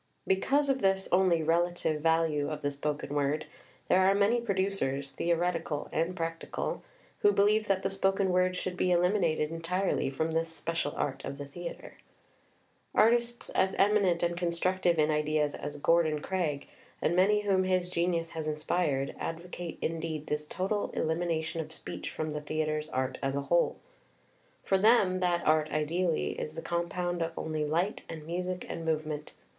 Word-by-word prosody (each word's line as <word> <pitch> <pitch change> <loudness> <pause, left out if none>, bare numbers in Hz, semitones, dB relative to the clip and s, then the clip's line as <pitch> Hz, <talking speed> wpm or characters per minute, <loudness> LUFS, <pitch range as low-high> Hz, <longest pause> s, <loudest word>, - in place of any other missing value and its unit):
Because 275 +10 +2
of 270 -1 +1
this 190 0 +2
only 180 -3 +4
relative 165 -1 +1
value 160 -2 +2
of 150 -1 -5
the 145 - +1
spoken 145 0 -3
word, 145 +1 0 0.4
there 185 - +4
are 190 +1 +4
many 210 +4 +3
producers 190 - -1
[theoretical 170 -3 -1
and 165 +3 0
practical] 165 -1 -3 0.4
who 415 - +5
believe 210 - +3
that 195 -1 +1
the 195 - +1
spoken 195 0 +1
word 180 0 +2
should 180 0 -3
be 180 - +1
eliminated 175 -4 +2
en 165 0 -5
tirely 180 -2 0
from 160 +4 -1
this 165 +1 0
special 165 -2 -2
art 135 -1 -2
of 140 - -5
the 145 - -6
theatre. 170 +5 -8 1.0
Artists 235 +1 +3
as 190 0 +1
eminent 195 -4 +3
and 175 0 +1
constructive 175 0 +1
in 155 0 +3
ideas 150 -1 +1
as 145 0 -6
Gordon 155 0 +3
Craig, 155 -5 -2 0.3
and 170 - +1
many 205 +3 +4
whom 195 -2 +2
his 185 -1 +1
genius 170 -1 0
has 160 -1 -4
inspired, 150 -2 0
advocate 170 +1 -5
indeed 160 -2 -3
this 150 0 -3
total 195 +5 -1
elimination 165 0 -1
of 155 0 -9
speech - - -6
from 155 -1 -3
the 150 0 -4
theatre's 155 0 -2
art 130 -2 -2
as 135 0 -1
a 140 - 0
whole. 170 +5 +2 0.9
For 195 - +2
them 200 -3 +5
that 180 -2 0
art 155 0 +3
ideally 165 +2 0
is 155 - -5
the 165 - -6
com 170 0 -1
pound 175 -1 -2
of 165 0 -1
only 155 -1 -2
light 170 +7 0
and 160 -2 -7
music 180 +2 -3
and 165 - -5
movement. 155 -2 -2
170 Hz, 165 wpm, -30 LUFS, 155-185 Hz, 1.0 s, who